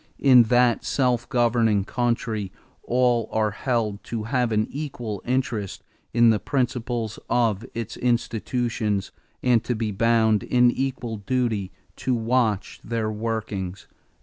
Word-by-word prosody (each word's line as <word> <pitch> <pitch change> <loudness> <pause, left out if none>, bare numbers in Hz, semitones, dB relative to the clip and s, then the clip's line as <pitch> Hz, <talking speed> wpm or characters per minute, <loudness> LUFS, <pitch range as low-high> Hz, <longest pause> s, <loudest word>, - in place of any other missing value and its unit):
In 125 -4 +6
that 120 0 +3
self 125 -3 0
governing 115 -5 +2
country 115 -4 -1 0.3
all 120 -2 +1
are 110 -1 +1
held 110 -2 -2
to 115 -2 -4
have 125 0 0
an 110 0 +2
equal 120 -8 -5
interest 120 -6 -2 0.3
in 120 -1 +5
the 110 - +1
principles 120 -4 -2
of 115 -4 +1
its 115 -1 -5
institutions 115 -3 -1 0.3
and 120 -3 +3
to 120 - -1
be 110 -1 -2
bound 110 0 +3
in 125 -1 +3
equal 125 -4 -3
duty 110 -3 -1 0.3
to 130 - 0
watch 115 -3 0
their 110 -2 -2
workings." 105 -4 -4
115 Hz, 125 wpm, -24 LUFS, 110-125 Hz, 0.3 s, In